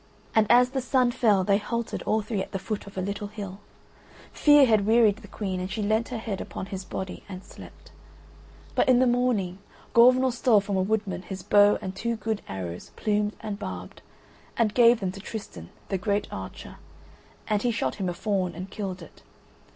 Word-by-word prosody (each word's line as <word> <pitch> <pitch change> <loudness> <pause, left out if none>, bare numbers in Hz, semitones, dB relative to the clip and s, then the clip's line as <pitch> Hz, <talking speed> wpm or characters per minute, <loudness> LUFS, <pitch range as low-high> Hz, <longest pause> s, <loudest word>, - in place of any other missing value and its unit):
And 220 -1 +4
as 250 +1 +6
the 265 - -1
sun 250 0 +2
fell 215 -6 +3
they 200 +1 +3
halted 235 +2 -3
all 215 0 +2
three 210 -2 -2
at - - -7
the - - 0
foot 205 +1 -5
of 200 - -12
a 185 - -1
little 200 +1 -4
hill: 200 -2 -8 0.7
fear 295 -2 +6
had 215 -4 +2
wearied 220 -2 +5
the 225 - -13
Queen, 190 -2 -4
and 185 +1 -4
she 210 +2 -3
leant 220 +3 +1
her 250 - -4
head 220 -4 -4
upon - - -6
his 190 -1 -6
body 190 0 -6
and 185 -1 -8
slept. - - -14 0.8
But - - +2
in 255 - +6
the 255 - +4
morning, 240 -7 +1 0.3
Gorvenal 255 +2 +6
stole 235 -2 +4
from 200 0 -3
a 190 - +2
wood 215 +2 0
man 185 -2 -5
his 190 -1 -7
bow 205 0 +5
and 190 0 -5
two 235 +2 -2
good 220 -1 -3
arrows 90 -2 -6
plumed 210 0 0
and 210 -1 -5
barbed, 90 -1 -7 0.6
and 220 -3 +2
gave 235 -2 +5
them 190 -2 -1
to 195 - -10
Tristan, 195 - -8 0.2
the 195 - -1
great 205 +2 0
archer, 95 0 -8 0.7
and 210 -1 +1
he 245 - +1
shot 230 -2 -1
him 190 -3 -2
a - - -2
fawn 185 -3 -1
and 185 +3 -7
killed 190 -4 -5
it. - - -15
205 Hz, 205 wpm, -26 LUFS, 190-230 Hz, 0.8 s, as